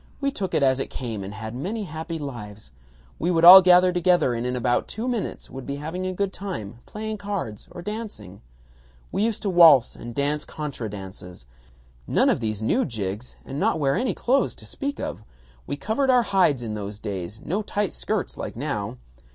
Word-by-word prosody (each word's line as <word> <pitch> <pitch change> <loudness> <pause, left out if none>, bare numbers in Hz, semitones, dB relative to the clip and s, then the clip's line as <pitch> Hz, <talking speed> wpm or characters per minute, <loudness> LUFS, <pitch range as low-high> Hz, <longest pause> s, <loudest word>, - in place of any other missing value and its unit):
We 275 -1 0
took 195 -8 -3
it 140 - +2
as 130 -1 +3
it - - -2
came 115 -6 -5
and 95 - -6
had 110 +1 -7
happy 165 - -4
lives.... 105 - -8 0.5
We 170 - 0
would 170 -1 +3
all 190 +2 +13
gather 180 0 +6
together 175 -7 +3
and 120 +1 -2
in 125 - -1
about 120 0 +1
two 225 +4 -4
minutes 240 -5 -3
would 135 -1 -8
be 140 - -3
having 160 +6 -4
a 185 - -2
good 195 0 -1
time 120 - -6
playing 215 0 -5
cards 200 - -4
or 175 - -9
dancing.... 210 - -7 0.7
We - - -1
used 220 -1 0
to 205 - 0
waltz 165 -8 +7
and 120 0 -9
dance 145 +1 0
contra 140 -7 -5
dances. 95 -7 -9 0.6
None - - +3
of - - 0
these 110 -2 -2
new 255 - +2
jigs 105 - -4
and 135 +2 -5
not 160 - +1
wear 140 -2 +2
any 255 - 0
clothes 265 +3 +1
to - - -11
speak 280 0 -4
of. 110 - -5 0.4
We - - -2
covered 225 - 0
our 250 -2 +5
hides 170 - +2
in 110 -2 -4
those 105 -1 -5
days; 100 -1 -5
no 190 - -2
tight 205 -2 -2
skirts - - -3
like - - -5
now. - - -3
150 Hz, 195 wpm, -24 LUFS, -, 0.7 s, all